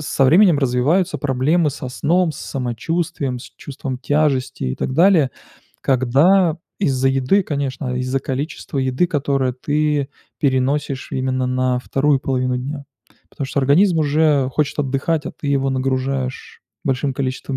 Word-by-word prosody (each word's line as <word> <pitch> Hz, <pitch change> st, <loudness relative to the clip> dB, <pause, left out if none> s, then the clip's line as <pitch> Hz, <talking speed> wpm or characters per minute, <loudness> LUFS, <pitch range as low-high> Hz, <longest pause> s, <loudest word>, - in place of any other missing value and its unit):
со 135 Hz, -, +2 dB
временем 170 Hz, +3 st, +5 dB
развиваются 145 Hz, +8 st, +1 dB
проблемы 145 Hz, +4 st, +1 dB
со 130 Hz, -1 st, -6 dB
сном, 165 Hz, +6 st, +1 dB
с -, -, -11 dB
самочувствием, 135 Hz, +2 st, -3 dB
с 120 Hz, -, -11 dB
чувством 135 Hz, -2 st, -6 dB
тяжести 145 Hz, -, 0 dB
и 65 Hz, 0 st, -1 dB
так -, -, -3 dB
далее. 165 Hz, -3 st, +4 dB, 0.5 s
Когда 150 Hz, +7 st, +3 dB, 0.2 s
из-за 135 Hz, -7 st, +2 dB
еды, 135 Hz, +9 st, +2 dB
конечно, 135 Hz, -5 st, -3 dB
из-за 130 Hz, +1 st, -1 dB
количества 140 Hz, +2 st, -4 dB
еды, 130 Hz, +6 st, +1 dB
которое 140 Hz, -5 st, 0 dB
ты 145 Hz, +2 st, 0 dB, 0.3 s
переносишь 135 Hz, 0 st, 0 dB
именно 130 Hz, 0 st, -1 dB
на 125 Hz, 0 st, 0 dB
вторую 140 Hz, +2 st, +1 dB
половину 130 Hz, -1 st, -1 dB
дня. 140 Hz, +3 st, -5 dB, 0.5 s
Потому 140 Hz, -, -5 dB
что 140 Hz, -, -3 dB
организм 165 Hz, +6 st, +4 dB
уже 150 Hz, -2 st, +2 dB
хочет 150 Hz, 0 st, 0 dB
отдыхать, 145 Hz, +3 st, -1 dB
а -, -, -5 dB
ты 145 Hz, -, -6 dB
его 135 Hz, -1 st, +1 dB
нагружаешь 130 Hz, 0 st, -2 dB, 0.2 s
большим 135 Hz, 0 st, 0 dB
количеством 130 Hz, 0 st, -3 dB
135 Hz, 140 wpm, -20 LUFS, 130-150 Hz, 0.5 s, временем